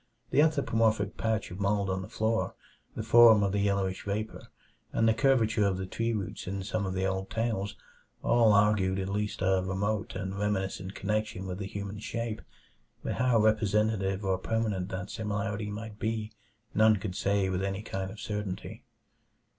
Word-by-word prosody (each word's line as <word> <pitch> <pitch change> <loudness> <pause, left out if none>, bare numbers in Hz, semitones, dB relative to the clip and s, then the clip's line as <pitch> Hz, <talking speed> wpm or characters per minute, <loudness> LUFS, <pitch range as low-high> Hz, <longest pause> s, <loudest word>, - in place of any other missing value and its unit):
The - - +5
anthropomorphic 115 -9 +2
patch 110 -3 -1
of 90 - -7
mold 100 0 +1
on 95 0 -1
the 95 - -8
floor, 110 +1 0 0.4
the 110 - -3
form 115 -2 +7
of 100 - +1
the 100 - 0
yellowish 100 -2 0
vapor, 105 +2 -4 0.4
and 115 - +2
the 110 - +5
curvature 115 -3 +3
of 95 -2 0
the 95 - -3
tree 115 +5 -1
roots 100 -5 -4
in 95 0 -3
some 105 0 -2
of 95 - -3
the 95 0 0
old 95 0 -2
tales, 110 -3 -1 0.5
all 115 -2 +5
argued 100 -2 +3
at 95 0 -2
least 105 0 -2
a 95 0 +3
remote 100 +3 -2
and 95 +1 -4
reminiscent 95 -1 -2
connection 105 -1 -2
with 90 0 -5
the 100 - -4
human 100 +1 -5
shape; 115 0 -4 0.6
but - - -1
how 125 -2 +4
representative 105 -2 +2
or 95 -1 +1
permanent 105 -3 -1
that 95 +1 -5
similarity 105 0 -2
might 105 0 -7
be, 110 -1 -2 0.4
none 110 0 +5
could 95 -2 -4
say 100 0 +1
with 95 0 -1
any 100 +1 -2
kind 95 -2 -4
of 105 +2 -10
certainty. 105 -3 -5
105 Hz, 175 wpm, -29 LUFS, 95-110 Hz, 0.6 s, form